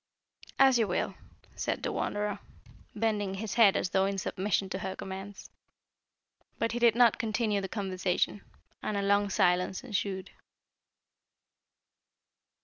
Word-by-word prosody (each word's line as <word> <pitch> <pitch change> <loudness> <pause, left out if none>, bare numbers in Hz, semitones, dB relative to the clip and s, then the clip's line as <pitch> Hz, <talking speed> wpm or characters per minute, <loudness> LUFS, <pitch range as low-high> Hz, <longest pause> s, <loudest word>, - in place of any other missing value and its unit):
"As 265 -2 +6
you 225 - +2
will," 180 - -1 0.4
answered - - -3
the - - -1
Wanderer 205 0 -2 0.6
bending 205 -3 0
his 210 +1 -4
head 225 -5 +6
as 185 - -2
though 190 0 +3
in 195 0 -2
submission 195 +1 -1
to 190 - -2
her 190 0 -4
commands. 195 +1 -8 1.1
But 230 - 0
he 240 - -2
did 235 -2 +5
not 235 -2 +5
continue 215 -2 0
the 190 - -5
conversation, 190 -1 -1 0.4
and 210 - -2
a 200 - -1
long 200 0 +2
silence 180 +2 +1
ensued. 200 -5 -3
200 Hz, 135 wpm, -30 LUFS, 190-220 Hz, 1.1 s, As